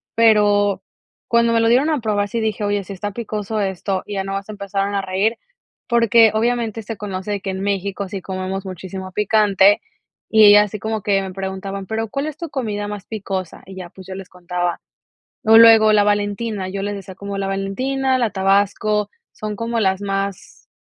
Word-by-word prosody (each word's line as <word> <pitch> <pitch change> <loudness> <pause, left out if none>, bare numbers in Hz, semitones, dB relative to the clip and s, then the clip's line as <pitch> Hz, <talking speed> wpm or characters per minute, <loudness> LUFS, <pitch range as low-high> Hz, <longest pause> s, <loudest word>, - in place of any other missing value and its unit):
pero 205 -3 +3 0.4
cuando 235 0 +3
me 230 - +3
lo 225 - +3
dieron 260 +6 +3
a 300 -5 0
probar 205 -2 0
sí 230 +1 -2
dije: 215 -1 -2
"Oye, 205 0 0
sí 200 - -7
está 205 +2 -4
picoso 215 -1 -3
esto". 190 0 -2
Y 210 - -7
ya 195 - -1
nada 195 0 -3
más 200 +2 -17
empezaron 200 -1 -3
a 200 - +1
reír, 195 +4 0 0.5
porque 230 -2 +5
obviamente 225 0 -1
se 220 +1 -6
conoce 195 -1 -5
de 200 -1 -2
que 195 - -3
en 190 0 -5
México 200 0 -2
sí 195 0 -5
comemos 190 +1 -4
muchísimo 185 +1 -7
picante, 205 -1 +3 0.5
y 220 -1 +7
ellas 205 0 +8
así 210 +1 -6
como 220 +1 -3
que 200 -1 +2
me 190 - -6
preguntaban: 195 0 -5
"Pero, 225 0 -3
¿cuál 275 +5 -3
es 310 -1 -6
tu 335 -3 -6
comida 215 -7 -3
más 205 -1 -7
picosa?". 195 -4 -5
Y 190 - -11
ya, 180 -2 -7
pues, 190 +1 -14
yo 190 - -6
les 190 -1 -9
contaba. 175 -1 -3 0.7
O 225 +1 +8
luego 225 -1 +8
la 205 -1 +4
Valentina, 205 -1 -1
yo 195 +1 -4
les 205 +1 -2
decía 190 -1 -9
como 200 0 -6
la 195 - -2
Valentina, 260 +8 -1
la 235 -3 +1
Tabasco, 200 +2 +1 0.2
son 215 -1 -5
como 230 +2 -2
las 190 -2 +1
más, 195 -1 -4
205 Hz, 200 wpm, -20 LUFS, 195-220 Hz, 0.7 s, ellas